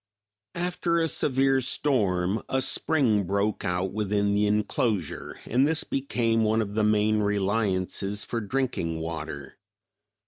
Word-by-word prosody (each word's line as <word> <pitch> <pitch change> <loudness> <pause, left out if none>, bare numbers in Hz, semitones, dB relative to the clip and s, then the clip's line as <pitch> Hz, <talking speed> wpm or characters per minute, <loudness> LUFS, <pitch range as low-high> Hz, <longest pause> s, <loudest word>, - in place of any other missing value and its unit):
=After 175 -1 0
a 165 - +2
severe 135 -3 +2
storm 105 -8 0
a 130 - +1
spring 130 -7 +1
broke 100 +3 -1
out 90 +1 -1
within 100 -1 0
the 105 +1 +2
inclosure, 105 - -1
and 130 +5 +2
this 160 0 +1
became 115 -4 0
one 110 +1 +2
of 100 -1 -7
the 110 0 +1
main 105 0 +3
reliances 100 -1 -1
for 115 - -3
drinking 105 -8 -2
water. 80 -4 -6
105 Hz, 130 wpm, -26 LUFS, 100-130 Hz, -, main